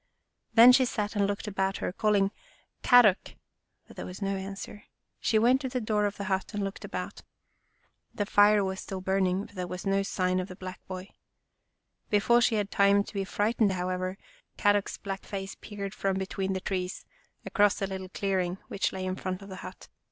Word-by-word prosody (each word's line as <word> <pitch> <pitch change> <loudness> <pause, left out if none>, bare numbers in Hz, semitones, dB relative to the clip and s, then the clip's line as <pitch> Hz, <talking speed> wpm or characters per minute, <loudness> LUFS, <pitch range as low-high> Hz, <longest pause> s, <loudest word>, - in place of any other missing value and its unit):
Then 235 +2 +10
she 255 +1 +5
sat 210 -3 -2
and 200 -1 +2
looked 200 +1 -3
about 195 -2 -1
her, - - -3
call 210 +1 +2
ing 195 0 +2 0.3
" - - -39
Kadok! 240 -7 +5 0.3
" - - -51
but - - -15
there - - -5
was 180 - -8
no 195 -1 -1
answer. 195 +2 -7 0.3
She 220 - +2
went 245 +5 +4
to 260 - -3
the 255 0 -2
door 215 -2 +1
of 205 - -6
the 200 - -4
hut 190 +2 -2
and 205 - -1
looked 195 0 -5
about. - - -5 0.9
The 205 - -2
fire 205 0 +5
was 190 0 -3
still 190 - -5
burning, 190 +1 0
but - - -16
there 180 -2 -4
was 180 +2 -6
no 195 0 +2
sign 185 -1 0
of 185 - -3
the 185 - -9
black 185 0 -8
boy. 185 +1 -7 1.0
Before 225 +3 +4
she 240 -1 +3
had 205 -1 -1
time 200 0 +4
to - - -12
be 200 -1 -1
frightened, 205 +1 +1
however, 185 +1 -2 0.4
Kadok's 205 -1 +2
black 195 -1 -5
face 195 -1 -5
peered 200 -2 -6
from 195 -1 -1
between 190 0 -2
the 190 - -3
trees, 185 -1 -3 0.4
across 205 -1 +3
the 195 - -1
little 190 -1 -6
clearing 185 -2 -1
which 195 - 0
lay 190 -1 -4
in 185 0 -2
front 185 +1 -4
of 195 - -11
the 190 - -7
hut. - - -10
195 Hz, 205 wpm, -28 LUFS, 190-205 Hz, 1.0 s, Then